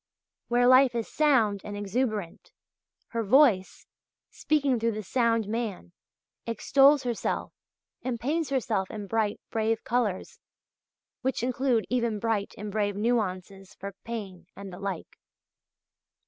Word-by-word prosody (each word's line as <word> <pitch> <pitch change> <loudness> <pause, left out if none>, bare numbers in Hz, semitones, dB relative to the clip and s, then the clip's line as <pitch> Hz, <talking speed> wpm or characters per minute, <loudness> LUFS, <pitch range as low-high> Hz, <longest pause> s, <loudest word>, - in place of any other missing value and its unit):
Where 245 +1 +3
life 255 0 +6
is 230 -2 -2
sound 235 -10 +2
and 205 0 -6
exuberant, 205 -3 -3 0.6
her 230 - -2
voice, 215 -4 +3 0.5
speaking 285 -5 +1
through 230 0 0
the 215 0 -5
sound 230 0 +1
man, 210 - -4 0.6
extols 275 +4 +4
herself 240 -3 -2 0.5
and 245 -2 -3
paints 300 +5 -1
herself 230 -8 -1
in 210 -2 -6
bright, 215 0 -1
brave 225 0 0
colours, 230 -6 -1 0.8
which 265 -2 -1
include 250 -2 +1
even 235 -3 0
bright 210 -2 -1
and 210 0 -6
brave 205 -1 0
nuances 195 -3 -2
for 200 +1 -7
pain 200 -7 -7
and 195 -2 -9
the 180 - -9
like. 195 -4 -6
225 Hz, 125 wpm, -27 LUFS, 205-250 Hz, 0.8 s, life